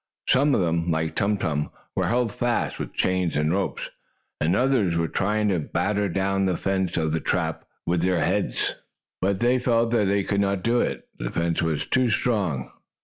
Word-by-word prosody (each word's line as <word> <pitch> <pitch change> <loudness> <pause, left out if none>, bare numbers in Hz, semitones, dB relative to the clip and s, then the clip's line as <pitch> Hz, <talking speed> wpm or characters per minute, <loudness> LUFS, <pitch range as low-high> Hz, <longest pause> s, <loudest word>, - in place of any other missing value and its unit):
Some 140 +1 +4
of - - +2
them, 85 0 0
like 80 -1 0
Tum 105 +1 +1
Tum, 75 -5 -1 0.3
were - - +1
held 120 -2 +1
fast 120 +3 -1
with - - -6
chains 90 -4 +1
and 75 +2 +1
ropes, 100 0 -2 0.5
and 85 +4 +2
others 120 -8 +2
were 85 -1 +1
trying 105 +4 0
to 90 -3 +1
batter 100 +6 0
down 95 +2 0
the 90 - 0
fence 95 -2 -1
of 80 -2 +1
the 80 - 0
trap - - -1 0.2
with 85 0 +1
their 90 0 +2
heads. - - 0 0.4
But 95 0 0
they 125 +2 +3
felt 115 -2 +2
that 115 -3 +3
they 100 0 +2
could 100 +1 0
not 100 -2 0
do 120 +1 +2
it, - - -3
as - - -4
the - - -1
fence 85 0 0
was 80 -3 -1
too 130 -2 +2
strong. 100 - 0
95 Hz, 200 wpm, -25 LUFS, 85-110 Hz, 0.5 s, Some